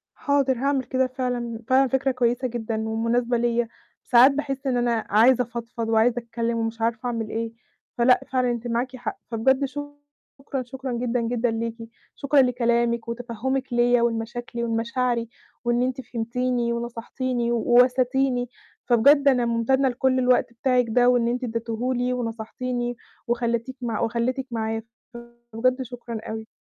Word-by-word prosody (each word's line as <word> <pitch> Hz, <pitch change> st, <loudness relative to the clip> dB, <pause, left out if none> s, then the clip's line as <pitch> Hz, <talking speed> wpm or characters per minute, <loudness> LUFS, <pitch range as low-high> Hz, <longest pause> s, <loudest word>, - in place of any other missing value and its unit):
حاضر 275 Hz, -3 st, +1 dB
هاعمِل 275 Hz, -1 st, 0 dB
كده. 260 Hz, 0 st, +1 dB
فعلًا 245 Hz, -3 st, -3 dB
فعلًا 265 Hz, 0 st, +4 dB
فكرة 265 Hz, +2 st, +1 dB
كويسة 250 Hz, 0 st, 0 dB
جدًا 225 Hz, -2 st, -3 dB
ومناسبة 235 Hz, +2 st, 0 dB
ليَّ، 235 Hz, 0 st, +1 dB, 0.4 s
ساعات 250 Hz, +2 st, +7 dB
باحس 275 Hz, -1 st, -3 dB
إن 255 Hz, -2 st, +1 dB
أنا 235 Hz, -2 st, 0 dB
عايزة 245 Hz, +4 st, +5 dB
أفضفض 235 Hz, -1 st, -5 dB
وعايزة 225 Hz, +2 st, +3 dB
أتكلم 230 Hz, 0 st, -2 dB
ومش 225 Hz, 0 st, -3 dB
عارفة 230 Hz, +2 st, -1 dB
أعمل 225 Hz, -3 st, -2 dB
إيه، 230 Hz, 0 st, -3 dB, 0.5 s
فلأ 250 Hz, +1 st, +5 dB
فعلًا 255 Hz, -1 st, +2 dB
أنتِ 240 Hz, 0 st, -3 dB
معاكِ 245 Hz, +2 st, -2 dB
حق 245 Hz, -, -5 dB
فبجد 265 Hz, +5 st, +2 dB
شكرًا 290 Hz, -1 st, -7 dB
شكرًا 260 Hz, +1 st, -6 dB
جدًا، 240 Hz, 0 st, -1 dB
جدًا 235 Hz, 0 st, 0 dB
ليكِ 230 Hz, 0 st, -3 dB, 0.4 s
شكرًا 280 Hz, -1 st, +3 dB
لكلامِك 235 Hz, -2 st, +1 dB
وتفهمِك 245 Hz, +2 st, -3 dB
ليَّ 240 Hz, 0 st, +4 dB
ولمشاكلي 235 Hz, +1 st, -2 dB
ولمشاعري 235 Hz, +1 st, -1 dB, 0.4 s
وإن 240 Hz, +1 st, +2 dB
أنتِ 255 Hz, +1 st, -1 dB
فهمتيني 240 Hz, 0 st, -1 dB
ونصحتيني 235 Hz, +1 st, -2 dB
و 235 Hz, -, +1 dB
واسيتيني، 250 Hz, +1 st, +3 dB, 0.4 s
فبجد 280 Hz, +4 st, +5 dB
أنا 250 Hz, -3 st, +3 dB
مُمتنّة 260 Hz, +4 st, +2 dB
لكل 255 Hz, +1 st, +1 dB
الوقت 250 Hz, -1 st, +2 dB
بتاعِك 250 Hz, 0 st, +1 dB
ده 245 Hz, +2 st, +4 dB
وإن 240 Hz, -2 st, +3 dB
أنتِ 250 Hz, +1 st, -2 dB
ادّيتهُ 230 Hz, +2 st, -2 dB
لي 245 Hz, +1 st, 0 dB
ونصحتيني 240 Hz, +1 st, -3 dB, 0.3 s
وخلّيتِك 235 Hz, +1 st, -1 dB
مع 230 Hz, -3 st, -2 dB
وخلّيتك 240 Hz, +3 st, -1 dB
معايا 225 Hz, -1 st, -2 dB, 0.7 s
فبجد 255 Hz, +3 st, +1 dB
شكرًا 240 Hz, -2 st, -7 dB
أوي. 220 Hz, 0 st, -5 dB
240 Hz, 145 wpm, -24 LUFS, 230-255 Hz, 0.7 s, ساعات